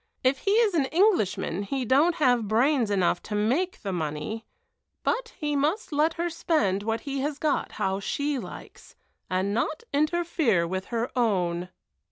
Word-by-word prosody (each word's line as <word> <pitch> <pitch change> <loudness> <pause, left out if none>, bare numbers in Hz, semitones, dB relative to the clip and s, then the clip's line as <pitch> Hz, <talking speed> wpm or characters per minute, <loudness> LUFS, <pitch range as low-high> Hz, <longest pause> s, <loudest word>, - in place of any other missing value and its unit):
If 260 +1 +2
he 395 - 0
is 445 -3 +4
an 305 -5 +2
Englishman 315 - +1
he 255 +6 -2
don't 290 +8 +4
have 245 -8 +2
brains 240 +2 +2
enough 185 -3 +1
to 210 - -5
make 265 - 0
the 195 -2 -2
money, 160 +7 -3 0.6
but 475 -1 -1
he 295 -1 -1
must 310 +10 0
let 305 +2 +2
her 340 +1 -1
spend 310 - 0
what 225 +2 -2
he 275 -1 -4
has 290 +1 -2
got 300 -1 -1
how 190 0 -1
she 285 +7 -1
likes, 195 - -11 0.3
and 185 +2 0
not 300 - -1
interfere 305 - +2
with 190 +2 -3
her 235 0 -2
own." 180 -7 0
255 Hz, 165 wpm, -26 LUFS, 200-310 Hz, 0.6 s, is